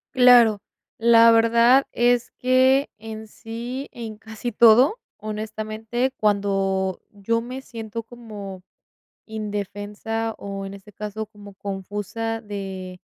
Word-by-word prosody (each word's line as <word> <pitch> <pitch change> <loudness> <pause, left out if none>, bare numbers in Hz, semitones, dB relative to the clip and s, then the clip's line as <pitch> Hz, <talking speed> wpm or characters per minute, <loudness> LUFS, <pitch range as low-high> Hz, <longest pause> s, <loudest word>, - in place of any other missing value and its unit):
Claro. 240 -5 +6 0.4
La 230 0 +7
verdad 235 +4 +5
es 240 0 +2
que 260 +2 +3
en 220 0 -8
sí, 240 +5 -6
en 225 -3 -7
casi 225 +2 -6
todo, 240 - +6 0.2
honestamente, 215 +3 -3
cuando 195 -2 0
yo 230 +3 -1
me 255 +3 -7
siento 225 -2 -7
como 210 -5 -9 0.7
indefensa, 210 +1 -4
o, 195 -1 -5
en 195 - -7
este 200 +1 -13
caso, 210 +1 -5
como 205 -1 -13
confusa 205 +3 -4
de, 190 -3 -6
220 Hz, 110 wpm, -23 LUFS, 205-235 Hz, 0.7 s, La